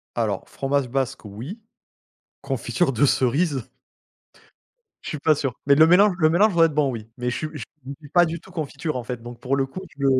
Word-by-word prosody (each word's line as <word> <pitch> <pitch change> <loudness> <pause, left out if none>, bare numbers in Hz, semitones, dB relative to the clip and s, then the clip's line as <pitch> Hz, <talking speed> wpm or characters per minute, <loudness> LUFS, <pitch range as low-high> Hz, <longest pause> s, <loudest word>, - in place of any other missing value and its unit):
Alors, 110 -5 -1
fromage 135 -2 -1
basque, 130 -2 -2
oui, 120 - -8 0.8
confiture 175 -6 0
de 140 +5 +3
cerise? 135 0 +1 1.3
Je - - -6
suis 150 - -4
pas 155 +1 +3
sûr, 135 -4 -3
mais 140 - +5
le 155 +2 +7
mélange 185 +3 +5
le 155 -2 +4
mélange 195 +4 +4
doit 165 -1 +6
être 155 - 0
bon 145 -2 +2
oui, 115 -3 -6
mais 125 0 -1
je - - -3
suis 155 - -3
je 150 - -7 0.4
suis 145 -3 -14
pas 175 +2 +5
du 170 0 -4
tout 185 +3 -17
confiture, 155 -2 -4
en 125 - -3
fait, 120 -1 -5
donc 120 0 -9
pour 135 +1 0
le 135 - +1
coup 185 +8 -8 0.2
je 140 - 0
140 Hz, 210 wpm, -23 LUFS, 125-165 Hz, 1.3 s, le